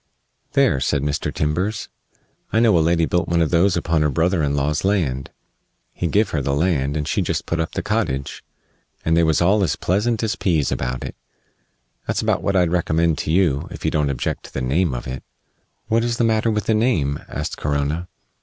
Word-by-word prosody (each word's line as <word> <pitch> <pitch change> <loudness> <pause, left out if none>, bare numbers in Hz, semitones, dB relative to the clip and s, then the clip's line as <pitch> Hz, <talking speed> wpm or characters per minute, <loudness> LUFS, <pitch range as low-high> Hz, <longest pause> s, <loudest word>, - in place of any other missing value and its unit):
"There," 65 - +3
said 70 +1 0
Mr. 75 0 -1
Timbers, 90 +7 -1 0.6
"I 110 - +3
know 115 -4 +4
a 85 - +4
lady 85 +1 +2
built 90 +2 0
one 85 0 +1
of 80 -2 +1
those 90 +2 +3
upon 80 -2 +1
her 75 - +2
brother 85 +4 +1
in 70 -1 0
law's 70 +2 0
land. 80 -10 0 0.6
He 90 - -2
give 105 +4 +2
her 75 - 0
the 70 +1 0
land, 75 -3 +1
and 75 - -2
she - - 0
just - - -2
put 85 - -2
up 80 - -2
the - - -3
cottage, 70 +1 -2 0.6
and 80 - +3
they 85 - +4
was 80 0 +3
all 100 +4 +3
as 90 - +1
pleasant 110 +5 0
as 110 - 0
pease 80 -7 +1
about 65 0 -2
it. - - -6 0.9
That's - - -1
about - - +1
what 100 - 0
I'd 90 -3 +3
recommend 85 -2 +1
to - - -2
you, 80 -6 +2
if - - -8
you - - +2
don't 75 -2 +1
object 70 - -3
to - - -13
the - - 0
name 70 +3 +1
of - - -5
it." 65 0 -5 0.7
"What 115 +1 +2
is 120 -1 -1
the - - +1
matter 110 0 +2
with 105 -2 -1
the 110 - +2
name?" 105 - +1
asked - - -4
Corona. 75 +4 -1
80 Hz, 210 wpm, -21 LUFS, 70-95 Hz, 0.9 s, know